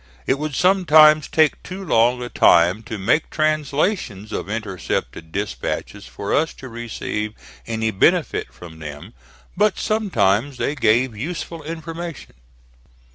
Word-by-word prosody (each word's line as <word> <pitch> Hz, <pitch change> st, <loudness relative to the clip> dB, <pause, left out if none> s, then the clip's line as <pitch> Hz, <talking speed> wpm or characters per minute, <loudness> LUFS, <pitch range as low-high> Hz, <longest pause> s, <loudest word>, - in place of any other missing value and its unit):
It 135 Hz, -, +1 dB
would 150 Hz, -2 st, -3 dB
sometimes 155 Hz, -5 st, +5 dB
take 155 Hz, -2 st, +2 dB
too 190 Hz, +1 st, -8 dB
long 125 Hz, -3 st, +3 dB
a 120 Hz, -, -5 dB
time 90 Hz, +2 st, +4 dB
to 110 Hz, -, -4 dB
make 115 Hz, +11 st, +1 dB
translations 155 Hz, -, -1 dB
of -, -, -4 dB
intercepted 95 Hz, -6 st, -4 dB
dispatches 100 Hz, -9 st, -4 dB
for 65 Hz, +11 st, -4 dB
us 160 Hz, +2 st, +1 dB
to 130 Hz, -, -10 dB
receive 110 Hz, -2 st, -4 dB, 0.3 s
any 110 Hz, -1 st, -1 dB
benefit 95 Hz, -, +1 dB
from 80 Hz, -2 st, -12 dB
them. 75 Hz, -2 st, -9 dB, 0.4 s
But 210 Hz, -1 st, +2 dB
sometimes 135 Hz, -, +1 dB
they 145 Hz, -, -1 dB
gave 120 Hz, -2 st, +2 dB
useful 165 Hz, +6 st, -5 dB
information. 165 Hz, 0 st, -7 dB
125 Hz, 130 wpm, -21 LUFS, 105-160 Hz, 0.4 s, sometimes